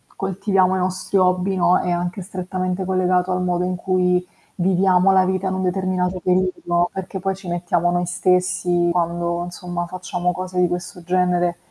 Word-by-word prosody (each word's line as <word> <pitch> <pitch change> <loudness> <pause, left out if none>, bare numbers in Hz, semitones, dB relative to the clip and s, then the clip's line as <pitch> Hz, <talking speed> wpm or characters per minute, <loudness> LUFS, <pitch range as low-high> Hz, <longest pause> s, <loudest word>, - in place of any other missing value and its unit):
coltiviamo 190 -1 +1
i - - 0
nostri 185 +2 -1
hobby, 185 +1 +2
no, 180 0 +3
è 180 - -1
anche 175 +2 -2
strettamente 185 0 -3
collegato 185 0 +1
al 180 0 0
modo 180 -1 0
in 180 0 -1
cui 180 0 +1 0.3
viviamo 185 +1 +3
la 190 -1 +4
vita 190 +1 -1
in 190 - -1
un 190 - -2
determinato 185 0 -1
periodo, 180 -1 +1
perché 190 0 -5
poi 195 +1 -1
ci 190 -1 -12
mettiamo 175 0 0
noi 175 0 0
stessi 180 0 +1
quando, 170 0 -1
insomma, 175 0 -5
facciamo 180 0 -2
cose 185 0 -3
di 180 - +4
questo 175 0 -5
genere. 180 -1 +1
180 Hz, 170 wpm, -21 LUFS, 175-185 Hz, 0.3 s, la